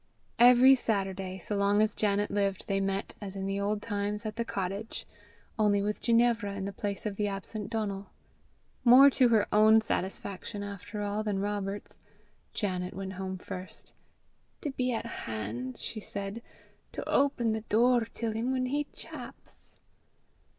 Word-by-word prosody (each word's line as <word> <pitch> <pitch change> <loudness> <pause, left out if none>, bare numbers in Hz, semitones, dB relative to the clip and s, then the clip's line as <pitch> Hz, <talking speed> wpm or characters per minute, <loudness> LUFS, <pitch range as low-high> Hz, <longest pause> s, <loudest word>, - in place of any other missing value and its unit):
Every 250 +2 +8
Saturday, 195 -6 -1
so 205 +3 -3
long 200 +1 +3
as 215 0 +3
Janet 205 -1 0
lived, 200 -1 0
they 195 -1 +1
met, 195 0 -2
as 200 -1 -6
in 195 0 -3
the 195 0 -1
old 205 +1 -1
times, 210 0 -2
at 215 -1 -3
the 235 - -1
cottage 200 +1 -4 0.5
only 205 -2 +3
with 210 +1 -2
Ginevra 230 -3 +2
in 195 -1 -4
the 200 - -4
place 200 +1 -4
of 205 -2 -3
the 210 - +1
absent 200 +1 -5
Donal. 205 -3 -3 0.7
More 260 +3 +9
to 255 -1 +4
her 220 -3 +4
own 215 +1 +7
satisfaction, 200 0 -3
after 205 +1 -5
all, 205 +1 -1
than 210 -2 -1
Robert's, 205 0 -3 0.5
Janet 185 -3 -2
went 190 0 -5
home 190 0 -4
first, 185 0 -6 0.7
"to 295 - -2
be 255 -1 -1
at 230 -1 -2
han'," 115 - -5
she 220 - -6
said, 200 +1 -5 0.5
"to - - -5
open 270 -5 +2
the 220 0 -1
door 235 +2 +3
till 230 -1 -2
him 225 +3 -2
whan 260 -1 0
he 290 +3 -1
chaps." - - -11
205 Hz, 160 wpm, -30 LUFS, 195-225 Hz, 0.7 s, More